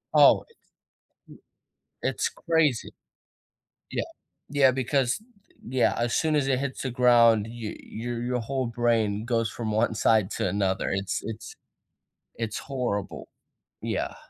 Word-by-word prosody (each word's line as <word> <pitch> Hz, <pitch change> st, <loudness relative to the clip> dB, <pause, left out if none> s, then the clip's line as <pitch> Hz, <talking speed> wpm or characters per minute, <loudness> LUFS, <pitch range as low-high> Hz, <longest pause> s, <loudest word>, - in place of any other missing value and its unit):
Oh, -, -, +7 dB
its 465 Hz, -, -27 dB, 1.4 s
it's -, -, 0 dB
crazy. 160 Hz, -, 0 dB, 1.0 s
Yeah. -, -, -1 dB, 0.5 s
Yeah, 140 Hz, -2 st, +5 dB
because, 130 Hz, -, 0 dB, 0.5 s
yeah, 130 Hz, 0 st, +2 dB
as 120 Hz, 0 st, 0 dB
soon 155 Hz, -1 st, +1 dB
as 135 Hz, -2 st, +1 dB
it 130 Hz, -, +2 dB
hits 135 Hz, -1 st, -3 dB
the 130 Hz, -, -2 dB
ground, 115 Hz, -3 st, +5 dB
y 115 Hz, -2 st, -6 dB
your 120 Hz, +1 st, -5 dB
your 125 Hz, 0 st, -1 dB
whole 130 Hz, +2 st, -2 dB
brain 115 Hz, -3 st, +1 dB
goes 115 Hz, -2 st, 0 dB
from 110 Hz, -1 st, -4 dB
one 110 Hz, +1 st, +1 dB
side 110 Hz, -3 st, +3 dB
to -, -, -1 dB
another. 95 Hz, -1 st, 0 dB
It's 95 Hz, 0 st, -1 dB
it's 115 Hz, 0 st, -7 dB, 0.8 s
it's 115 Hz, -2 st, -3 dB
horrible. 120 Hz, -7 st, -3 dB, 0.5 s
Yeah. -, -, -2 dB
120 Hz, 130 wpm, -26 LUFS, 110-130 Hz, 1.4 s, Oh